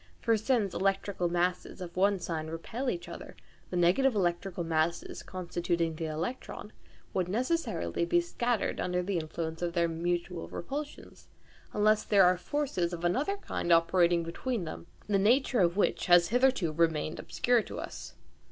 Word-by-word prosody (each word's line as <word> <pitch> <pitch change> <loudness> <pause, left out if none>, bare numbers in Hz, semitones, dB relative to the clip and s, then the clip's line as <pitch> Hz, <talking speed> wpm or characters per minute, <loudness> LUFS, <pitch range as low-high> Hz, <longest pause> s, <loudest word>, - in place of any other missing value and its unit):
For 230 -1 +2
since 220 -3 +1
electrical 195 -2 0
masses 175 +1 -1
of 175 -2 -7
one 200 +2 +3
sign 165 -3 -4
repel 220 +11 -4
each 345 - -4
other, - - -9 0.3
the 180 - -2
negative 205 +9 +3
electrical 175 -1 -1
masses 165 +1 -1
constituting 175 -2 -2
the 160 - -4
electron 165 +11 -5 0.4
would 185 -2 0
necessarily 255 - -1
be 345 0 +3
scattered 245 -9 -1
under 180 0 0
the 190 -1 -1
influence 160 +1 -5
of 175 -1 -1
their 170 -1 +2
mutual 170 +1 -2
repulsions, 290 - -7 0.4
unless 215 +1 +3
there 200 -2 +5
are 180 +1 +5
forces 180 -5 -2
of 175 0 -4
another 280 - +1
kind 175 - -3
operating 170 0 +4
between 210 +6 -3
them, 165 +1 -7 0.2
the 200 -2 +1
nature 245 +4 +3
of 175 0 +3
which 205 - +1
has 175 -1 +6
hitherto 245 -8 +2
remained 160 -1 0
obscure 245 -1 +1
to - - -7
us. - - -8
180 Hz, 155 wpm, -30 LUFS, 170-225 Hz, 0.4 s, has